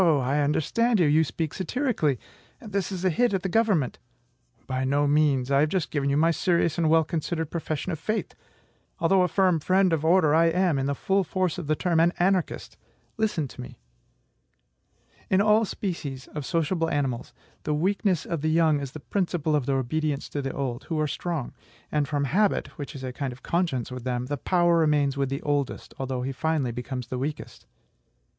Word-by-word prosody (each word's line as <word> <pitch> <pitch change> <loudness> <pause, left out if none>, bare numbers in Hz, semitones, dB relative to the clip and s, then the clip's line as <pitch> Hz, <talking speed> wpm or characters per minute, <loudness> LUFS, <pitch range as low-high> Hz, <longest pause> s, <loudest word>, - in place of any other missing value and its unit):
I 145 -5 +3
understand 195 - +1
you; 175 - +5
you 155 +2 +4
speak 155 +3 -3
satirically. 190 - 0 0.4
This 200 -4 -3
is 190 -1 -4
a 185 - +4
hit 240 +4 +2
at 185 - -2
the - - 0
government." 200 - +1 0.7
"By 130 0 -2
no 140 +2 +2
means. 145 -3 +2
I 140 - +4
have 150 +2 +3
just 185 -3 -1
given 140 -2 0
you 140 - +2
my 165 +2 +4
serious 170 0 +1
and 160 -2 +2
well 160 0 +5
considered 160 0 -3
profession 160 +1 -3
of 160 - -4
faith. 215 +7 -2 0.6
Although 185 +2 +3
a 180 - +3
firm 185 -3 +2
friend 185 +3 +3
of 160 -2 0
order, 160 -2 +4
I 165 +1 +5
am 170 -3 +2
(in 135 - -1
the 140 - -1
full 195 +7 +1
force 185 0 -1
of 165 - -6
the 155 - +2
term) 170 0 +1
an 170 +2 +4
anarchist. 185 -1 0 0.4
Listen 210 -9 0
to - - -9
me." - - -10 1.5
In 190 - +3
all 215 +2 +4
species 150 -10 -4
of 150 -4 -6
sociable 165 0 0
animals, 135 -5 -2 0.3
"the 150 - -1
weakness 185 +1 +1
of 165 -4 -3
the 155 - +1
young 160 -2 +3
is 140 -2 -6
the 155 - -7
principle 170 -2 -1
of 145 -4 -1
their 135 -1 +2
obedience 145 +2 -2
to 145 - -3
the 135 - -3
old," 130 -2 -4
who 160 -2 -2
are 155 - +2
strong; 155 -2 -3 0.4
and 150 -2 +1
from 145 -1 -1
habit, 200 +9 +1
which 145 -4 -7
is 135 - -7
a 130 -1 -4
kind 135 0 -3
of 125 +2 -13
conscience 165 -9 -1
with 125 -1 -6
them, 125 -1 -2
the 145 +2 -3
power 175 +2 +2
remains 150 -3 +2
with 140 -1 -1
the 135 +1 -4
oldest, 145 -3 -2
although 130 -1 -2
he 135 - -2
finally 145 -2 -1
becomes 125 +1 -5
the 125 +1 -4
weakest. 145 +3 -5
155 Hz, 200 wpm, -26 LUFS, 140-180 Hz, 1.5 s, you